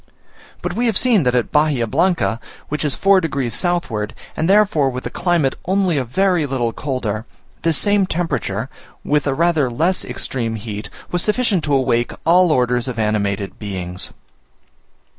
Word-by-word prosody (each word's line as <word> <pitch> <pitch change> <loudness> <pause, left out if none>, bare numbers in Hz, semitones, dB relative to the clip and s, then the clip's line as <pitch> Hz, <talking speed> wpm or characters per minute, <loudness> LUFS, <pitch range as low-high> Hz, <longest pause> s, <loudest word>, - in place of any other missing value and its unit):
But 180 - -2
we 240 +5 0
have 220 - +2
seen 235 -6 +5
that 125 0 +2
at 120 - 0
Bahia 150 -5 +2
Blanca, 160 - +1 0.3
which 150 +1 -2
is 145 -3 0
four 195 -1 +4
degrees 140 -8 -2
southward 130 - -1 0.2
and 165 - 0
therefore 195 -9 +4
with 130 0 -6
a - - -4
climate 175 -6 +1
only 190 -2 +1
a 135 - +1
very 180 +4 +1
little 120 -4 -1
colder, 115 -6 -3 0.3
this 165 -2 +2
same 205 -2 +3
temperature 135 - -2 0.4
with 145 -1 +1
a 135 - +1
rather 160 -4 +2
less 165 +10 0
extreme 125 -2 -2
heat, 105 -1 -6 0.2
was 175 - +2
sufficient 210 -5 +1
to 145 -2 +2
awake 120 -3 +1
all 175 +1 +5
orders 125 -2 +1
of 125 -3 -4
animated 100 -3 -1
beings. 95 -3 -5
140 Hz, 160 wpm, -19 LUFS, 115-175 Hz, 0.4 s, seen